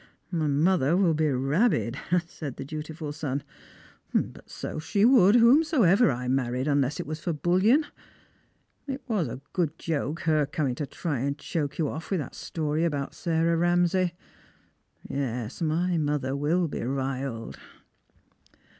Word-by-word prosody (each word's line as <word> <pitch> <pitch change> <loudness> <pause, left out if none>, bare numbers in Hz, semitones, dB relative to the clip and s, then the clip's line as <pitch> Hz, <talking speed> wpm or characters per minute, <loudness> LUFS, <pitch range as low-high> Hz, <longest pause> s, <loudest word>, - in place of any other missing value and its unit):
" - - -42
My 160 -4 0
mother 150 +1 +3
will 185 -4 +3
be 155 0 +1
rabid," 135 - +1 0.3
said 155 -5 -7
the 135 - -6
dutiful 155 +1 -6
son; 145 -2 -3 0.4
" - - -28
but - - -2
so - - -5
she 200 +6 +2
woiild 230 -5 +6
whomsoever 245 - +5
I 125 -1 -2
married, 130 0 0
unless 140 -1 +1
it - - -3
was 155 +2 -5
for 165 +2 -2
bullion. 185 - +3 1.0
It 270 0 -4
was 205 - 0
a 125 +3 -7
good 165 -3 -1
joke 160 0 -2
her 155 -3 +2
coming 145 -3 -1
to 140 +3 -4
try 145 -2 -3
and 140 +3 -1
choke 145 -3 -3
you 160 - +1
off 160 +4 -6
with 190 - 0
that 140 - -6
story 155 -2 -2
about 145 -5 -1
Sarah 165 0 +1
Ramsay. 175 +1 +2 0.9
Yes; 125 -1 -3
my 170 +3 +1
lOother 145 -3 -1
will 165 +5 +1
be - - -5
riled." 130 -2 -3
155 Hz, 155 wpm, -27 LUFS, 140-175 Hz, 1.0 s, woiild